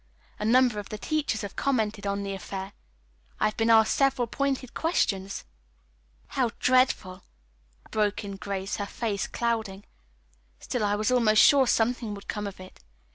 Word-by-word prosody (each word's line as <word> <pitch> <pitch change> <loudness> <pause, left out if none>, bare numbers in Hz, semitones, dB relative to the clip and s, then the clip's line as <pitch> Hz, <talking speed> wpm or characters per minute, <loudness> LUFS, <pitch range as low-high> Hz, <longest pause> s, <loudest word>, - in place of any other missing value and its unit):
A 210 - -2
number 245 -1 +4
of 205 - -8
the 215 - -5
teachers 295 -3 -1
have 205 - -7
commented 215 -7 -1
on 200 0 -1
the 195 0 -3
affair. 195 +1 -6 0.7
I've 215 0 +1
been 225 0 +1
asked 220 -1 +5
several 270 -3 +2
pointed 270 +1 -2
questions." 195 - -1 0.9
"How 255 -4 0
dreadful!" 250 -7 +2 0.7
broke 210 -1 0
in 200 -1 -6
Grace, 195 0 -4
her 205 - -3
face 210 -3 -2
clouding. 220 -4 -2 0.8
"Still 245 - -3
I 205 0 +2
was 215 +3 0
almost 225 -4 +5
sure 275 -3 +6
something 230 -2 +1
would 200 - -12
come 210 -1 -3
of 195 - -9
it. 185 0 -12
215 Hz, 155 wpm, -27 LUFS, 200-245 Hz, 0.9 s, sure